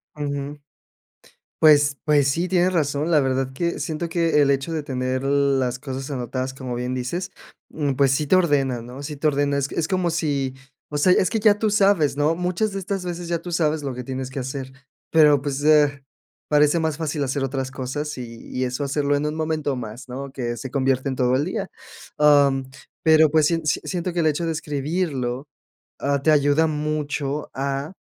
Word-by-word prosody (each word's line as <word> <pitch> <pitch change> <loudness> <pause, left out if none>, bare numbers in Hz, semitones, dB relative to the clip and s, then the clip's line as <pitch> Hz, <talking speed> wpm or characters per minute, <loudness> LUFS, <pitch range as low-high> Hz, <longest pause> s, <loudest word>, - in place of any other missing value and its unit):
Ujú. 145 0 -4 1.0
Pues 145 -2 +5
pues, 145 -2 +3
sí, 170 +6 0
tienes 185 0 +2
razón. 150 -1 0
La 155 -3 +5
verdad 130 0 -1
que, 170 +5 -2
siento 165 +1 -3
que, 165 -3 +2
el 140 - +3
hecho 140 +4 0
de 155 -2 -2
tener, 130 -2 -2
las 135 -3 +1
cosas 135 +1 -6
anotadas, 130 0 -3
como 130 -2 -5
bien 125 +1 -3
dices, 170 +10 -3 0.4
mm, 145 -3 -1
pues 135 0 +3
sí 150 +2 0
te 185 - +3
ordena, 135 -8 +1
¿no?, 125 +4 -9
sí 150 0 -6
te 155 - -2
ordena. 140 0 +1
Es 140 - 0
c - - -7
es 160 - +1
como 185 -3 0
si 140 -5 -1 0.4
o 145 - -2
sea, 180 +5 +5
es 185 - +3
que 220 -2 0
ya 205 -1 +4
tú 215 -1 +1
sabes, 195 -9 +3
¿no? 155 +3 +2
Muchas 180 +4 -1
de 195 - -3
estas 195 0 -3
veces, 175 -1 -5
ya 170 -1 0
tú 175 - -7
sabes, 155 -2 0
lo 135 -3 -4
que 125 0 -6
tienes 130 0 -4
que 130 +1 -5
hacer. 130 0 -5 0.4
Pero, 150 -3 +5
pues, 145 0 -3
eh, 145 -2 +4 0.5
parece 150 +2 +4
más 160 -1 -1
fácil 150 -2 -2
hacer 135 +1 -2
otras 135 -1 -3
cosas, 140 +2 -4
y 115 -2 -9
y 130 0 -1
eso 125 +3 -3
hacerlo, 145 +1 0
en 145 - -1
un 150 - -2
momento 155 -3 -1
más, 120 +2 -7
¿no? 135 +2 -6
Que 120 -3 -3
se 125 +3 -7
convierte 135 0 0
en 130 - -3
todo 125 0 +2
el 145 - +1
día. 190 +1 -3 0.5
Am, 140 -3 +4 0.3
pero, 155 -1 +5
pues, 155 -1 +4
sien 165 0 +1
s 150 -1 0
siento, 180 -1 -3
que 175 - -1
el 160 - +2
hecho 155 +2 +1
de 165 - 0
escribirlo, 145 -3 -2 0.5
ah, 140 0 0
te 155 - +3
ayuda 145 +2 +3
mucho, 150 -1 -2
a 140 +3 -3
145 Hz, 205 wpm, -23 LUFS, 135-160 Hz, 1.0 s, Pues